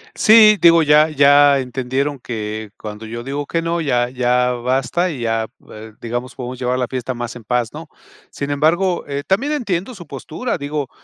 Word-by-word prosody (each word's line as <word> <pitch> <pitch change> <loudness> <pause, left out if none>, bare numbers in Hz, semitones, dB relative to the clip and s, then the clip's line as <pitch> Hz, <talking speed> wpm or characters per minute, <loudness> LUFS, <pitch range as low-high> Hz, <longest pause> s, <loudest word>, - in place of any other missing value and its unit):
Sí, 215 -1 +7
digo 170 -1 +6
ya 150 +1 +5
ya 145 -1 +5
entendieron 130 +2 -3
que 110 -3 -6
cuando 105 +1 -8
yo 120 +2 -7
digo 140 +2 -4
que 165 +3 -2
no, 165 0 -2
ya 120 -5 0
ya 125 0 +1
basta 130 +8 -1
y 140 -7 -6
ya, 115 -1 -1 0.2
eh, 110 0 -11
digamos, 120 +2 -5
podemos 125 0 -7
llevar 125 0 -1
la 125 - -1
fiesta 130 0 -4
más 120 -1 -6
en 120 - -11
paz, 120 0 -1
¿no? 160 +1 -9 0.4
Sin 140 0 -5
embargo, 170 +5 +1
eh, 140 0 -4
también 260 +11 0
entiendo 220 - -3
su 175 -4 -11
postura, 160 - -5
digo, 145 -1 -4
135 Hz, 185 wpm, -19 LUFS, 120-160 Hz, 0.4 s, Sí